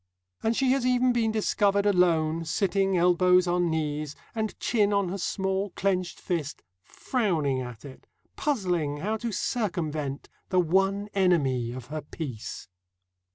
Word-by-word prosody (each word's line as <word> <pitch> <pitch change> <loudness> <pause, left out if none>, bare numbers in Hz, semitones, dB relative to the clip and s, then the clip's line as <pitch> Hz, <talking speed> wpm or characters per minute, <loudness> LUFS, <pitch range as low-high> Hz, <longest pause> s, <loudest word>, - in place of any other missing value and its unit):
And 225 +1 0
she 265 -1 +3
has 270 -1 +1
even 250 0 +3
been 225 -2 +1
discovered 200 -2 +1
alone, 165 -4 +2
sitting 195 +3 +1
elbows 180 +1 +4
on 175 -1 +1
knees, 150 -2 -2 0.2
and 220 -1 -3
chin 210 -3 +2
on 200 -3 +1
her 195 - -3
small 190 +3 -1
clenched 185 -2 -1
fist, 160 -5 -3 0.2
frowning 160 - -1
at 125 0 -8
it, 135 -2 -12 0.3
puzzling 180 - -1
how 205 +9 -1
to 235 +1 -4
circumvent 155 - -2 0.2
the 185 - +3
one 195 +4 +2
enemy 140 -11 +2
of 125 -1 -7
her 155 - -3
peace. 140 -7 -7
180 Hz, 140 wpm, -27 LUFS, 155-205 Hz, 0.3 s, elbows